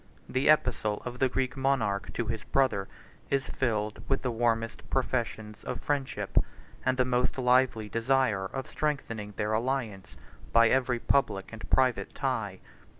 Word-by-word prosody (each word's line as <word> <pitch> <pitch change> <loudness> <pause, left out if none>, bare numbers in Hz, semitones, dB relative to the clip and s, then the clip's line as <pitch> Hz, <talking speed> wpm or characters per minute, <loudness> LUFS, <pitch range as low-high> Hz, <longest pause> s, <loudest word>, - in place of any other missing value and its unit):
The 130 +3 +1
epistle 110 -8 +2
of 125 0 -5
the 130 - +3
Greek 130 0 -1
monarch 130 -7 +1
81 - - -9
to 120 - -1
his 110 -1 -5
brother 130 -8 +1 0.4
is 140 -1 0
filled 105 -4 -1
with 135 - +1
the 125 - 0
warmest 115 -1 -1
professions 115 -4 -2
of 125 - -4
friendship, 140 -1 0 0.4
and 130 0 +1
the 130 - +3
most 125 +1 +1
lively 125 -3 +3
desire 115 -3 +1
of 135 +6 -5
strengthening 115 -9 -3
their 105 +2 -1
alliance 115 -4 -2 0.3
by 115 -1 +6
every 125 -2 +2
public 110 -6 0
and 110 - -8
private 125 -7 +2
tie. 110 -9 -2
125 Hz, 150 wpm, -29 LUFS, 110-130 Hz, 0.4 s, by